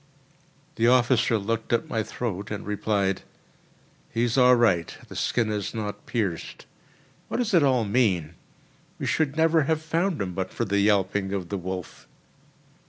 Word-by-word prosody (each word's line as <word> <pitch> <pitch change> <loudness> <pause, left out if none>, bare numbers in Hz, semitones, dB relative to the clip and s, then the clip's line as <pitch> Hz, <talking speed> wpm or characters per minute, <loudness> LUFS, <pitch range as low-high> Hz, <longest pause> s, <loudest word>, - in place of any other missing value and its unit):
The 115 - +3
officer 120 -2 +4
looked 110 +2 -3
at 120 - +1
my 110 - -1
throat 105 -3 -4
and 105 -2 -5
replied: 100 -2 0 0.9
"He 115 +1 -1
is 120 -1 +1
all 125 -1 +6
right; 95 -9 +2
the - - -9
skin 115 -3 0
is 105 +1 -3
not 105 -2 -5
pierced. 100 -9 -3 0.6
What - - -3
does 240 -4 -1
it 170 - +6
all 130 -5 +3
mean? 100 -8 +1 0.6
We - - -4
should 155 -2 0
never 160 -2 +3
have 160 +1 +1
found 165 +3 -1
him 95 -3 -3
but 95 +1 -3
for 115 - -2
the 100 -1 +1
yelping 100 -1 +1
of 90 -4 -3
the 100 - -2
wolf." 90 0 -6
110 Hz, 165 wpm, -25 LUFS, 100-125 Hz, 0.9 s, all